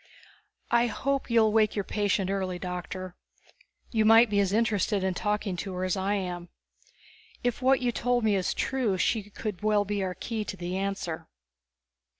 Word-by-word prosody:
"I 235 0 +4
hope 275 +4 -2
you'll 225 -2 +4
wake 215 -1 +3
your 205 - 0
patient 200 -2 0
early, 190 -2 -2
Doctor. 180 0 -5 0.8
You 220 -2 +2
might 225 +1 +6
be 200 - +3
as 195 -2 +2
interested 210 -2 +1
in 190 -1 +1
talking 210 0 -1
to 190 +1 -4
her 180 - -2
as 185 -1 0
I 195 +2 0
am. 175 -3 -4 0.9
If 245 0 -1
what 260 +1 +4
you 245 -1 +1
told 245 0 0
me 215 -2 +3
is 185 -2 0
true, 245 -8 0
she 205 +2 0
could 205 -2 -5
well 210 -1 +2
be 205 0 -2
our 185 -1 -2
key 225 -2 -3
to 195 - -6
the 180 0 -4
answer. 195 -4 -3
205 Hz, 175 wpm, -28 LUFS, 185-225 Hz, 0.9 s, might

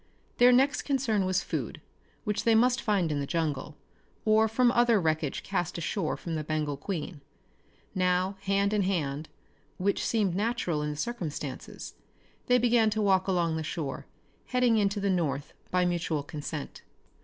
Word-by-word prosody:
Their 245 +1 +7
next 270 +3 +3
concern 245 -8 0
was 185 0 +1
food, - - -4 0.4
which 210 -2 -1
they 230 -1 +4
must 245 +3 +3
find 195 -7 +1
in 145 - -1
the 140 - -3
jungle, 150 -3 -2 0.5
or 220 0 +5
from 240 +2 +3
other 240 -3 +4
wreckage 155 -4 -1
cast 180 -4 -2
ashore 170 0 -2
from 170 - -5
the 155 -1 -2
Bengal 150 -1 -1
Queen. 155 0 -5 0.7
Now, 185 0 +1
hand 200 +1 +1
in 210 - +2
hand 155 -6 -1 0.5
which 200 +2 0
seemed 210 -6 +1
natural 195 -6 -1
in 150 - -2
the 150 - -4
circumstances 155 - -5 0.5
they 250 - +5
began 235 -2 +4
to 215 +1 -2
walk 190 -2 +3
along 170 -4 +1
the 160 - -3
shore, 155 -3 -4 0.4
heading 250 -3 +3
into 205 0 +1
the 200 0 +1
north 150 -6 -1 0.2
by 180 0 +2
mutual 170 -4 -1
consent. 150 0 -6
185 Hz, 160 wpm, -29 LUFS, 155-220 Hz, 0.7 s, Their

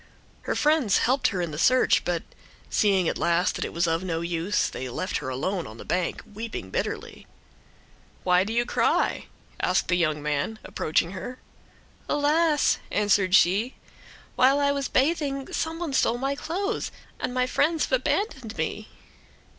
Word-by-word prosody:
Her - - +1
friends 300 -8 +3
helped 260 +3 +2
her 185 -3 -1
in 170 - -3
the 150 - -5
search, 255 +8 +4
but, - - -1 0.5
seeing 195 -4 +3
at - - -1
last 170 +1 +2
that - - -3
it - - -5
was 170 +1 +1
of 165 +1 0
no 165 -3 -2
use, 170 +4 0
they 130 - -5
left 185 +9 -2
her 140 - -5
alone 170 +8 -2
on 110 - -11
the - - -10
bank, 180 -1 -1
weeping 210 - -7
bitterly. - - -4 1.0
"Why 180 0 +4
do 210 - -4
you 240 +1 +1
cry?" - - +1 0.3
said 185 - +1
the 180 - +3
young 155 -3 +1
man, 150 +8 -1
approaching 165 +2 0
her. 245 +6 -6 0.7
"Alas!" 300 +1 +2
answered 200 -2 +3
she, 205 +8 +3 0.6
"while 270 +3 +4
I 280 0 +3
was 280 -1 -1
bathing 275 -1 0
some 320 0 -2
one 335 -4 -4
stole 240 -2 +2
my 270 +2 -1
clothes, 365 +9 -2 0.3
and - - -2
my 250 0 +1
friends 305 +5 +1
have - - -13
abandoned 300 - -1
me." - - -3
215 Hz, 165 wpm, -26 LUFS, 175-280 Hz, 1.0 s, search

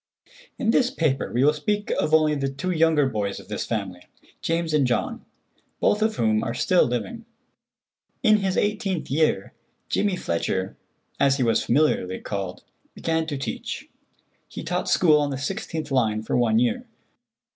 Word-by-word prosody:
In 225 -4 +1
this 250 +1 +3
paper 155 - -1
we 125 +2 +2
will 150 +2 +5
speak 205 +7 -2
of - - 0
only 155 -1 +4
the 135 -2 -1
two 140 +7 -3
younger 160 -4 +3
boys 105 -5 -2
of - - -14
this - - -3
family, 90 -1 -4 0.3
James 165 -1 -1
and 145 -4 +3
John, 120 - -1 0.6
both 210 - +2
of 220 0 +1
whom 110 -1 +1
are 115 - -3
still 180 +7 +3
living. 225 - -4 1.0
In 215 -3 +6
his 195 -2 -1
eighteenth 200 -7 -1
year, 145 -9 +1 0.4
Jimmy 205 -2 +1
Fletcher, 95 - -2 0.4
as 140 -1 +3
he 130 - +1
was 115 -2 +2
familiarly 120 -9 +1
called, 95 -3 -5 0.3
began 160 -1 -1
to 145 -3 -3
teach. 135 - -5 0.6
He - - -8
taught - - -2
school 155 -4 +5
on 145 - 0
the 135 - -3
16th 160 0 -4
line 110 -5 +1
for - - -2
one 115 -3 +3
year. 240 - +1
150 Hz, 165 wpm, -24 LUFS, 120-180 Hz, 1.0 s, In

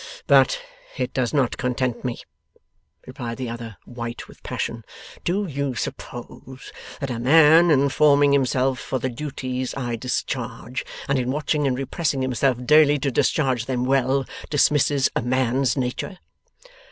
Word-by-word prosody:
'But - - +4 0.4
it - - -2
does 125 -3 0
not 135 -5 +1
content 125 -1 -2
me,' 125 -2 -4 0.8
replied 115 -1 -6
the 125 -2 -4
other, 115 -4 -8
white 120 -1 -7
with - - -17
passion. - - -4 0.4
'Do 195 +4 0
you 140 -5 -3
suppose 130 +2 -7 0.3
that 135 -2 -3
a 115 - -3
man, 160 +6 +6
in 140 -2 +4
forming 145 0 +4
himself 130 -1 +1
for 130 - -3
the 130 +1 -2
duties 130 -1 -4
I 120 -3 -2
discharge, 125 +1 -4 0.2
and 140 -1 +1
in 125 0 -2
watching 150 +1 0
and 125 -2 0
repressing 135 0 -1
himself 125 -1 0
daily 150 +1 +6
to 140 0 -1
discharge 130 -3 +1
them 125 -1 -1
well, 135 0 +2 0.2
dismisses 145 -1 +3
a - - +1
man's 130 +1 +1
nature? 130 +9 -3
130 Hz, 145 wpm, -23 LUFS, 125-145 Hz, 0.8 s, man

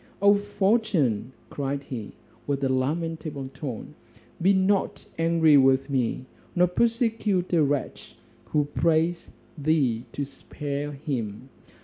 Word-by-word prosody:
"O 200 0 +6
fortune!" 200 - +1 0.2
cried 140 0 -3
he, 115 -7 -6 0.3
with 140 -1 -1
a 135 - +2
lamentable 150 0 -2
tone, 130 -5 -7 0.5
"be 190 +3 +5
not 195 +1 +1
angry 165 -2 +5
with 135 +1 +4
me, 130 -1 0 0.3
nor 180 0 +5
persecute 225 -2 +1
a 165 - +5
wretch 145 -1 -2 0.3
who 150 -2 +1
prays 165 +3 +1 0.3
thee 140 -6 +1
to 140 - -2
spare 145 +1 -5
him. 130 -5 -4
150 Hz, 115 wpm, -26 LUFS, 135-180 Hz, 0.5 s, O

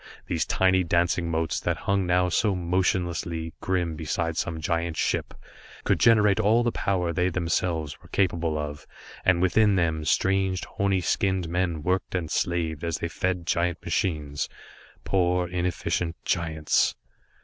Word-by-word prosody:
These - - -1
tiny 95 0 +3
dancing 85 0 +1
motes, 80 0 -1
that - - -1
hung 100 -2 +1
now 90 0 +3
so 100 +3 +1
motionlessly 85 -2 -1
grim 90 -3 -1
beside 80 +1 -2
some 85 -1 -2
giant 85 +1 -1
ship, - - -1 0.5
could - - +1
generate 110 -2 +5
all 110 +3 +4
the 120 - +1
power 90 -5 -1
they 90 +3 +1
themselves 85 -3 -1
were - - -16
capable 85 -4 0
of, 75 -1 -5 0.4
and 90 -1 +3
within 105 +2 +4
them 80 -3 0
strange, 95 +2 +1
horny 100 -1 0
skinned 95 0 0
men 85 -2 -1
worked 95 +2 -1
and 85 -4 -2
slaved, 85 -3 -1
as 85 -2 -1
they 85 - -3
fed 90 0 -2
giant 85 0 0
machines 75 -5 -1 0.5
poor 90 -1 +1
inefficient 90 -1 -2
giants. 80 -3 +1
90 Hz, 145 wpm, -26 LUFS, 80-95 Hz, 0.5 s, generate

